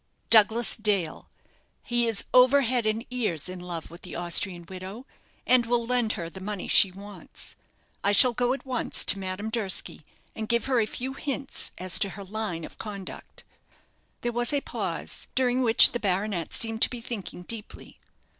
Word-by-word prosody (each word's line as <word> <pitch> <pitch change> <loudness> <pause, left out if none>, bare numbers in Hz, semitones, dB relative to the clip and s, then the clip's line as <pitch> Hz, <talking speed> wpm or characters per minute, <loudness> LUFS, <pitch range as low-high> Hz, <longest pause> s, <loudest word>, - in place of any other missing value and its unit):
"Douglas 225 +1 +5
Dale. 200 -7 -1 0.5
He 240 -1 +1
is 225 -3 0
over 255 +3 +6
head 245 -3 0
and 220 +2 -1
ears 210 - -1
in 185 0 -6
love 175 -3 -7
with 170 - -12
the 180 - -9
Austrian 175 0 0
widow, 190 +7 -9 0.4
and 250 -2 +3
will 235 0 +1
lend 240 -2 0
her 170 -5 -5
the 180 +3 -11
money 200 -1 -5
she 195 - +7
wants. 200 +2 -8 0.5
I 200 - +2
shall 240 +4 +7
go 245 +1 0
at 275 - -7
once 255 -2 0
to 195 - +4
Madame 190 +3 -5
Durski 205 -8 0 0.3
and 220 -1 -6
give 235 -1 +1
her 260 -3 +1
a 215 - +1
few 260 +4 -5
hints 275 0 -4
as 185 0 +1
to 200 - +2
her 200 +1 -9
line 195 -5 -4
of - - -14
conduct." 200 -3 -9 0.8
There 240 - -2
was 240 0 +2
a 285 - +1
pause, - - -3
during 255 0 +1
which 230 -2 +8
the 240 - -3
baronet 195 -3 -2
seemed 225 -1 0
to - - +5
be 245 - -7
thinking 215 -6 -7
deeply. 220 +2 -8
215 Hz, 180 wpm, -26 LUFS, 190-240 Hz, 0.8 s, which